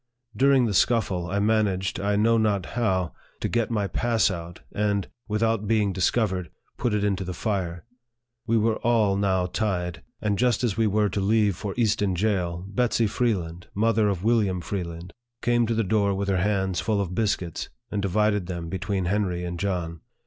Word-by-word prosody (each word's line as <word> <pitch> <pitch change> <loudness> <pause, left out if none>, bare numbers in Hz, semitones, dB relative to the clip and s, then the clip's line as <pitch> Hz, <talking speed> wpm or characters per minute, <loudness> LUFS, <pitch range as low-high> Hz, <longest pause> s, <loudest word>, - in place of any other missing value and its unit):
During 135 -2 +4
the 110 - -1
scuffle, 95 -4 +2
I 100 - -1
managed, 100 -3 +1
I 100 +1 0
know 115 +2 +3
not 105 -4 +1
how, 95 - 0 0.3
to - - -1
get 120 -2 0
my 105 -3 0
pass 115 +1 +1
out, 85 -1 -7
and, 100 -1 0 0.2
without 110 0 0
being 105 -3 +2
discovered, 95 -2 0 0.3
put 120 -4 0
it 105 - 0
into 100 -2 0
the 90 -1 -5
fire. 90 -4 -2 0.6
We 115 0 +3
were 110 0 +2
all 110 -4 +2
now 95 -2 +1
tied; 90 -3 -2 0.2
and 105 -2 -1
just 125 -1 +2
as 110 -5 +1
we 115 0 +2
were 105 0 +2
to 100 - -2
leave 105 -1 +2
for 100 +1 -5
Easton 105 -5 +1
jail, 90 -3 -1
Betsy 115 +3 +1
Freeland, 90 -7 -1
mother 110 0 +3
of 95 -2 -2
William 105 -5 +2
Freeland, 85 0 -5 0.3
came 120 -1 +2
to 115 - 0
the 115 - +2
door 100 0 +1
with 100 +1 -2
her 95 - +2
hands 95 -1 0
full 110 -2 0
of 95 -3 -2
biscuits, 90 -5 -1 0.2
and 105 - -1
divided 105 0 +1
them 85 -2 -5
between 95 +1 -2
Henry 90 -2 0
and 85 0 -4
John. 85 -4 -2
100 Hz, 180 wpm, -25 LUFS, 90-110 Hz, 0.6 s, During